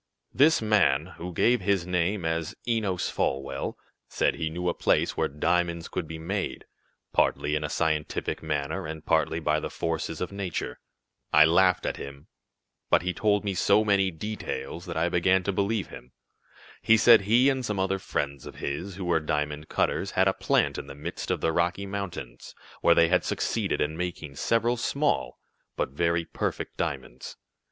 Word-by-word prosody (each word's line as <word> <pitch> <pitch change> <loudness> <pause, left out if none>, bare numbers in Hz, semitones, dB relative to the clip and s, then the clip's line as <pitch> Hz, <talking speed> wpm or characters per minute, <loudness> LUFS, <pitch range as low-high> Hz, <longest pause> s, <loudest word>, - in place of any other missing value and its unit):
"This 145 -2 +4
man, 90 -7 +2
who 90 +2 -5
gave 120 +7 +2
his 95 -2 +1
name 90 +1 0
as 80 0 -2
Enos 105 -6 0
Folwell, 70 0 -2 0.3
said - - +1
he 80 -2 -2
knew 90 +3 -4
a 85 - +2
place - - +1
where - - +1
diamonds 85 +3 0
could 85 -4 -4
be 80 - -6
made, 95 +5 -3 0.5
partly 75 - +2
in 75 0 0
a 75 - -2
scientific 80 -2 -1
manner, 75 +2 -2
and 80 0 -7
partly 80 0 +1
by 75 -1 +1
the - - -4
forces 80 -1 -3
of 90 - -3
nature. 100 -3 -4 0.5
I 75 +1 +7
laughed 90 +3 +3
at - - -2
him, 70 0 -9 0.6
but - - +4
he 90 0 -1
told 105 +3 +1
me 100 - 0
so 105 +4 +3
many 100 -2 +3
details 90 -1 -5
that 85 - -4
I - - +2
began 90 +2 +2
to 100 - 0
believe 100 +2 0
him. 65 - -12 0.7
He 115 +1 +5
said 115 0 +7
he 115 +6 +4
and 135 -2 +1
some 105 -4 -2
other 95 0 0
friends 70 -6 -3
of - - -10
his, 85 +7 -4
who 95 0 -5
were 85 -2 +2
diamond 75 -1 -2
cutters, - - 0
had - - +5
a - - +3
plant - - +1
in - - -8
the - - -9
midst 80 +4 -6
of - - 0
the 80 - +2
Rocky 85 +4 0
Mountains, 90 -12 -6 0.3
where - - +5
they 85 - +5
had 90 - +3
succeeded - - -1
in 75 +1 0
making 85 -4 -5
several 115 - +1
small, 140 +5 0 0.4
but - - -1
very 85 +3 0
perfect - - -4
diamonds. 65 -2 -5
85 Hz, 180 wpm, -27 LUFS, 80-100 Hz, 0.7 s, I